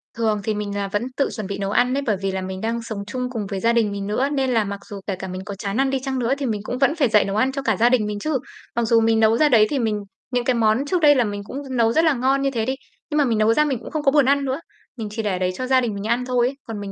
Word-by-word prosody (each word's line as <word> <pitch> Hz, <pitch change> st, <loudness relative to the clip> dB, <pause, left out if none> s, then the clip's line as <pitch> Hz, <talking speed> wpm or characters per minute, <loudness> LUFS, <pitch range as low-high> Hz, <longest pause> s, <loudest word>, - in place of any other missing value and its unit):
Thường 220 Hz, -3 st, 0 dB
thì 215 Hz, +1 st, 0 dB
mình 205 Hz, -1 st, -4 dB
là 200 Hz, -1 st, -2 dB
vẫn 205 Hz, +3 st, -1 dB
tự 275 Hz, -, +1 dB
chuẩn 215 Hz, -4 st, -5 dB
bị 200 Hz, 0 st, -4 dB
nấu 200 Hz, 0 st, -2 dB
ăn 245 Hz, +3 st, +2 dB
ấy, 280 Hz, -, 0 dB
bởi 210 Hz, -4 st, +1 dB
vì 195 Hz, 0 st, -1 dB
là 190 Hz, -, -3 dB
mình 185 Hz, 0 st, -5 dB
đang 230 Hz, +1 st, -2 dB
sống 220 Hz, -3 st, -5 dB
chung 250 Hz, +1 st, -3 dB
cùng 225 Hz, -5 st, -4 dB
với 195 Hz, -1 st, -3 dB
gia 230 Hz, +4 st, +2 dB
đình 225 Hz, -3 st, +2 dB
mình 200 Hz, 0 st, -4 dB
nữa, 250 Hz, +7 st, 0 dB
nên 270 Hz, -3 st, 0 dB
là 225 Hz, -2 st, +3 dB
mặc 200 Hz, 0 st, -5 dB
dù 200 Hz, -1 st, -6 dB
kể 195 Hz, -, -1 dB
cả 190 Hz, +1 st, -7 dB
mình 185 Hz, 0 st, -5 dB
có 200 Hz, -, -6 dB
chán 200 Hz, +1 st, -4 dB
ăn 270 Hz, 0 st, +2 dB
đi 270 Hz, -1 st, 0 dB
chăng 265 Hz, -1 st, -2 dB
nữa 240 Hz, +1 st, +1 dB
thì 275 Hz, -, -3 dB
mình 215 Hz, -4 st, -2 dB
cũng 245 Hz, -, -4 dB
vẫn 280 Hz, +4 st, +2 dB
phải 275 Hz, -7 st, +2 dB
dậy 210 Hz, -1 st, +4 dB
nấu 200 Hz, +1 st, -3 dB
ăn 255 Hz, +5 st, +2 dB
cho 275 Hz, +1 st, -4 dB
cả 225 Hz, -7 st, 0 dB
gia 235 Hz, +4 st, +4 dB
đình 245 Hz, -4 st, +2 dB
mình 210 Hz, -1 st, -3 dB
chứ. 305 Hz, +4 st, 0 dB, 0.4 s
Mặc 235 Hz, -, +1 dB
dù 230 Hz, 0 st, +4 dB
mình 225 Hz, 0 st, +3 dB
nấu 220 Hz, +1 st, +4 dB
ra 300 Hz, +2 st, +4 dB
đấy 220 Hz, -4 st, +6 dB
thì 285 Hz, -, -1 dB
mình 215 Hz, -3 st, 0 dB, 0.3 s
những 245 Hz, -1 st, 0 dB
cái 255 Hz, -, +3 dB
món 225 Hz, +3 st, +2 dB
trước 360 Hz, +3 st, 0 dB
đây 290 Hz, -2 st, +6 dB
là 250 Hz, -, +3 dB
mình 205 Hz, -2 st, -4 dB
cũng 255 Hz, -, -8 dB, 0.2 s
nấu 230 Hz, -1 st, +3 dB
rất 320 Hz, -, +3 dB
là 315 Hz, -, +4 dB
ngon 265 Hz, +2 st, +1 dB
như 275 Hz, 0 st, +1 dB
thế 230 Hz, -4 st, -1 dB
đi, 260 Hz, +2 st, -1 dB, 0.3 s
nhưng 300 Hz, -, -1 dB
mà 290 Hz, -, +4 dB
mình 230 Hz, -4 st, +1 dB
nấu 215 Hz, +1 st, +4 dB
ra 300 Hz, +5 st, +3 dB
mình 270 Hz, -5 st, -1 dB
cũng -, -, -10 dB
không 310 Hz, -2 st, -2 dB
có 275 Hz, -, +4 dB
buồn 290 Hz, -2 st, +4 dB
ăn 280 Hz, +1 st, +2 dB
nữa. 265 Hz, +2 st, -2 dB, 0.4 s
Mình 220 Hz, -2 st, -4 dB
chỉ 220 Hz, +1 st, -3 dB
để 195 Hz, -4 st, -1 dB
đấy 185 Hz, 0 st, 0 dB
cho 255 Hz, +4 st, -4 dB
gia 260 Hz, -1 st, +4 dB
đình 230 Hz, -3 st, -2 dB
mình 200 Hz, +2 st, -4 dB
ăn 240 Hz, +2 st, 0 dB
thôi 250 Hz, -1 st, +2 dB
ấy, 270 Hz, -, -4 dB
còn 225 Hz, -2 st, -5 dB
mình 200 Hz, -1 st, -6 dB
230 Hz, 350 wpm, -22 LUFS, 210-265 Hz, 0.4 s, đấy